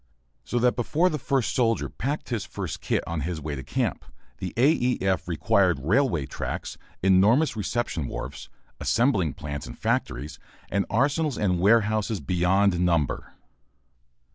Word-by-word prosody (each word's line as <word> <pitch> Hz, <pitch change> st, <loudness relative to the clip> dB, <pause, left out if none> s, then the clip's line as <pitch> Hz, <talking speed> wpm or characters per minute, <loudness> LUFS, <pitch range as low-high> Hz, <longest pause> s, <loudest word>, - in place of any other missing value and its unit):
So 120 Hz, -, -3 dB
that 125 Hz, +1 st, +3 dB
before 155 Hz, +9 st, +2 dB
the 150 Hz, -, -2 dB
first 135 Hz, -3 st, 0 dB
soldier 115 Hz, -3 st, +1 dB
packed 140 Hz, +5 st, -4 dB
his 115 Hz, -5 st, -1 dB
first -, -, -6 dB
kit -, -, 0 dB
on 85 Hz, -2 st, -3 dB
his 85 Hz, +2 st, -3 dB
way 75 Hz, 0 st, -4 dB
to 65 Hz, -, -5 dB
camp -, -, -2 dB, 0.4 s
the 90 Hz, -, -4 dB
A. 135 Hz, +6 st, +5 dB
E. 125 Hz, -5 st, +1 dB
F. 95 Hz, -2 st, 0 dB
required 90 Hz, +1 st, +2 dB
railway 85 Hz, -, +1 dB
tracks, -, -, -5 dB, 0.3 s
enormous 105 Hz, +11 st, +4 dB
reception 105 Hz, -, -2 dB
wharfs, -, -, -6 dB, 0.3 s
assembling 110 Hz, -, +2 dB
plants 70 Hz, -3 st, -6 dB
and -, -, -9 dB
factories, 70 Hz, +2 st, -2 dB, 0.3 s
and 100 Hz, -1 st, 0 dB
arsenals 145 Hz, +5 st, +1 dB
and 90 Hz, -4 st, +1 dB
warehouses 110 Hz, +1 st, +3 dB
beyond 90 Hz, +1 st, +2 dB
number. 85 Hz, -6 st, 0 dB
100 Hz, 145 wpm, -26 LUFS, 85-120 Hz, 0.4 s, A